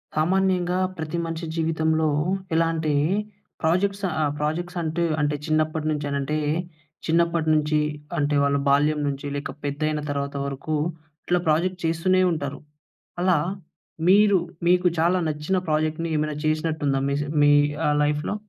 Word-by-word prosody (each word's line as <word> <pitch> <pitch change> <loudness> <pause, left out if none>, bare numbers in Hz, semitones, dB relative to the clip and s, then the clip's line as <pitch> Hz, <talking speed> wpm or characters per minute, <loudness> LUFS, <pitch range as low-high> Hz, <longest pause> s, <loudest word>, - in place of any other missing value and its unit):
సామాన్యంగా 180 +2 +1 0.2
ప్రతి 160 +1 -4
మనిషి 165 0 -4
జీవితంలో 160 -1 +1 0.5
ఇలాంటి 165 -1 +1 0.7
ప్రాజెక్ట్స్ 195 +5 +1
ఆహ్, 155 -3 0
ప్రాజెక్ట్స్ 170 +4 -2
అంటు, 165 +1 -1 0.2
అంటే 145 0 +1
చిన్నప్పటినుంచి 155 -1 0
అనంటే, 140 +2 -1 0.7
చిన్నప్పటి 170 0 +1
నుంచి 150 0 +2 0.4
అంటే 145 0 +1
వాళ్ళ 140 0 +2
బాల్యం 150 +2 +3
నుంచి 140 0 -4
లేక 145 - -4
పెద్దైన 150 +2 -1
తర్వాత 140 0 -3
వరకు 140 +3 -3 0.5
ఇట్లా 180 0 +2
ప్రాజెక్ట్ 175 +4 +1
చేస్తూనే 175 +3 +2
ఉంటారు. 140 -4 -3 0.6
అలా 180 -2 +3 0.7
మీరు 205 0 +6 0.3
మీకు 180 0 +4
చాలా 175 +3 +3
నచ్చిన 155 +5 -1
ప్రాజెక్ట్ 155 +1 0
ఏమైనా 155 0 -1
చేసినట్టు 155 0 -1
ఉందా 135 -1 +1
మీస్ 145 +1 -1 0.2
మీ 145 - +6 0.4
ఆ! - - +3
లైఫ్‌లో? 150 +6 -1
155 Hz, 125 wpm, -24 LUFS, 150-170 Hz, 0.7 s, మీరు